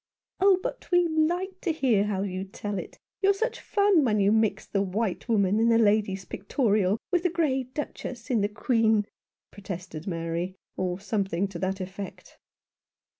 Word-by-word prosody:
"Oh, 380 -1 +5
but - - -5
we 355 -1 +4
like 350 +4 0
to 350 - 0
hear 245 -10 +2
how 200 -2 -1
you 185 -1 -3
tell 200 +1 -5
it. - - -9 0.2
You're 395 0 +4
such 465 +5 -2
fun 400 -6 +3
when 215 -5 +2
you 200 0 +4
mix 220 -1 +2
the 200 - 0
white 200 +3 -2
woman 205 -2 +3
in 230 +1 +4
the 230 - +5
Lady's 205 -3 +2
Pictorial 205 -2 +1
with 355 -2 +3
the 360 - +2
grey 295 -6 0
Duchess 255 -2 -6
in 230 -4 +3
the 205 - +1
Queen," 220 -1 +2 0.5
protested 180 -5 -7
Mary, 170 +1 -3 0.2
or 180 0 -2
something 195 -2 -1
to 180 -3 -7
that 190 +2 -1
effect. 190 +1 -8
210 Hz, 170 wpm, -27 LUFS, 195-275 Hz, 0.5 s, Oh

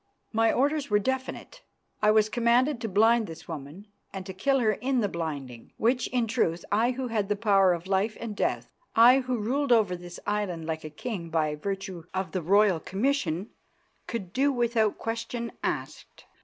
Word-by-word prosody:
My 225 +1 +3
orders 285 +2 +1
were 210 - +4
definite. 260 +5 -3 0.4
I 210 - +4
was 215 0 +5
commanded 240 +3 +2
to 225 - -3
blind 220 +3 +4
this 160 0 -10
woman 160 +4 -8 0.3
and 190 -1 -6
to 190 - -6
kill 270 +9 +1
her 225 -4 +3
in 250 +4 0
the 205 - +1
blinding, 145 -9 -6
which, 245 +2 +1
in 245 -2 0
truth, 210 -7 0
I 220 +4 +3
who 255 0 -4
had 210 -2 -1
power 195 -4 +4
of 170 0 -2
life 195 +3 0
and 225 -3 -5
death, - - -1 0.2
I 245 +4 +7
who 255 -1 -2
ruled 255 +6 -1
over 215 -6 +4
this 175 0 -10
island 200 -6 -2
like 160 -1 -3
a 155 - -6
king 170 +2 -5
by 155 -2 0
virtue 190 +1 -5
of 190 0 -2
the 185 - -2
royal 195 +1 +4
commission, 195 - -1 0.6
could 195 -6 -5
do 280 +2 +3
without 235 -4 +1
question 230 +1 -4
asked. - - -5
210 Hz, 180 wpm, -27 LUFS, 180-240 Hz, 0.6 s, I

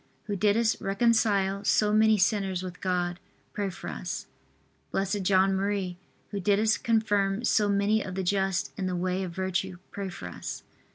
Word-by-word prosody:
who 210 -1 -3
didst 215 +3 +2
reconcile 200 -2 +2
so 210 +1 +3
many 220 0 +5
sinners 190 -2 +1
with 180 -1 -7
God, 180 -1 -1 0.3
pray 205 -2 -1
for 190 - -8
us. - - -4 0.7
B. 195 +1 0
J. 190 0 +2
M., 195 -1 +1 0.4
who 200 - -2
didst 210 +3 +2
confirm 215 -3 +1
so 210 -2 +3
many 200 +2 +2
of 185 -2 -5
the 190 - -1
just 190 0 0
in 190 - -1
the 180 - -1
way 185 +1 -1
of 185 - -3
virtue, 190 0 -2
pray 200 -1 -4
for 95 - -7
us. 90 - -6
195 Hz, 165 wpm, -28 LUFS, 185-210 Hz, 0.7 s, many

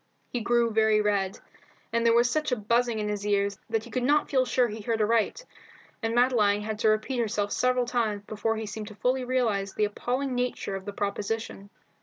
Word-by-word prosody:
He 245 - -2
grew 235 +1 +2
very 220 0 +3
red, 200 -2 0 0.6
and 230 0 +2
there 230 0 +4
was 240 +1 +5
such 305 +3 -1
a - - +3
buzzing 235 +2 +1
in 210 -1 -2
his 205 -1 -3
ears 200 -1 0
that 225 -1 0
he - - -12
could 255 - -1
not 290 +4 +2
feel 260 -2 +3
sure 250 -1 +2
he 215 0 -6
heard 225 +1 -1
aright, 225 - +1 0.6
and 225 0 -1
Madeline 225 -5 +3
had 215 0 -4
to 220 -1 +3
repeat 215 +4 0
herself 205 -3 -1
several 250 0 +2
times 225 -4 -1
before 215 +2 -2
he 220 - -4
seemed 210 +1 -6
to 210 - -10
fully 255 +5 0
realize 225 -6 0
the 210 - +2
appalling 250 +6 -2
nature 245 -5 -2
of 195 0 -7
the 205 - -4
proposition. 205 0 -3
225 Hz, 210 wpm, -27 LUFS, 210-245 Hz, 0.6 s, was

